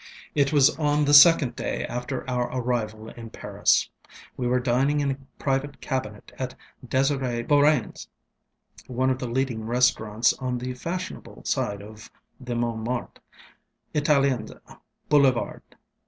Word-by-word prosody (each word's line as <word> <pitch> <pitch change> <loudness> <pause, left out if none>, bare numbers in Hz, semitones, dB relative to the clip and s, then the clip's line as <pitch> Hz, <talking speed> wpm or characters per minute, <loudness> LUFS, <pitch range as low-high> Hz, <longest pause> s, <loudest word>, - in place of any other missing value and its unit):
ŌĆ£It 140 -2 +2
was 145 0 +5
on 150 -1 +2
the 145 - +2
second 145 -3 +7
day - - -3
after 125 +2 -5
our 125 -1 -1
arrival 110 -3 -3
in 115 -1 -10
Paris. - - +1 0.5
We 125 - -2
were 125 +1 +2
dining 130 +4 +1
in 140 -1 +1
a 135 - -4 0.2
private 135 0 -2
cabinet 130 -7 -4
at 130 -1 -4 0.3
D├®sir├® 130 -2 0
BeaurainŌĆÖs, 145 -4 +2 0.8
one 130 +1 0
of 130 - -2
the 125 - -4
leading 125 -2 -1
restaurants 115 -2 +2
on 125 -2 -2
the 125 +1 -4
fashionable 180 +8 -6
side 100 0 -1
of 110 +1 -12 0.3
the 125 -2 -5
MontmartreŌĆöItaliens 125 +4 -2 0.5
Boulevard. 135 -5 +2
130 Hz, 125 wpm, -25 LUFS, 120-140 Hz, 0.8 s, second